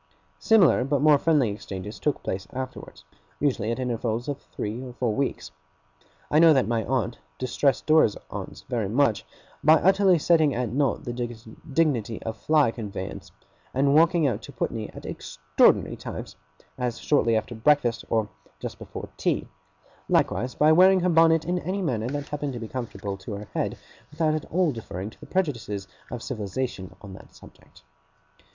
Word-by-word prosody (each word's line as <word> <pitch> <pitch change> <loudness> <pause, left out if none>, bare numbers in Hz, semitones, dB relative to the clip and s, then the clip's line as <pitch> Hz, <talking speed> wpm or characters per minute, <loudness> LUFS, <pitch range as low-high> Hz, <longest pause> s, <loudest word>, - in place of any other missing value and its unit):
Similar 200 - +5
but 140 +1 0
more 150 -2 +6
friendly 145 -9 +2
exchanges 100 0 -7
took 150 - -1
place 95 0 -4
afterwards, 130 0 -7 0.4
usually 130 -7 0
at 115 - -2
intervals 120 -2 -2
of 145 -2 -4
three 110 +4 -5
or 125 -2 -8
four 120 -2 -1
weeks. 130 - -2 0.8
I 150 - +5
know 165 -1 +8
that 130 -3 +2
my 115 -1 0
aunt 125 -2 -1 0.2
distressed 130 +1 0
Dora's 155 -9 +4
aunts - - -7
very 115 -6 -2
much, 120 -1 +2 0.4
by 155 +2 +7
utterly 190 +2 +4
setting 160 -2 +3
at 125 -1 -1
naught 140 +1 +1
the 120 - -4
dignity 120 +1 -2
of 110 -1 -4
fly 150 0 +3
conveyance, 100 -5 -7 0.4
and 140 +1 +3
walking 165 +1 +4
out 120 -5 0
to - - -10
Putney 110 -2 -3
at - - -11
extraordinary 75 0 +1
times, - - -7 0.4
as 120 -2 -1
shortly 115 -6 +2
after 110 +2 -2
breakfast 120 0 +2
or 110 -2 +1 0.3
just - - -6
before - - -8
tea; - - 0 0.6
likewise 125 +6 +1
by 150 +1 +5
wearing 185 +3 +6
her 180 - +2
bonnet 165 -1 +4
in 180 +2 0
any 190 +2 -3
manner 115 -8 -1
that 145 +2 -4
happened 145 -2 -3
to 120 - -5
be 115 - -6
comfortable 105 -5 -5
to 105 +3 -7
her 100 +1 -7
head, - - -2 0.3
without 155 +1 0
at 155 - -2
all 175 -2 +1
deferring 105 -4 -6
to - - -20
the - - -12
prejudices 115 - -2 0.2
of 120 -2 -6
civilization 110 -3 -4
on 100 -2 -9
that - - -14
subject. - - -18
125 Hz, 170 wpm, -25 LUFS, 110-150 Hz, 0.8 s, know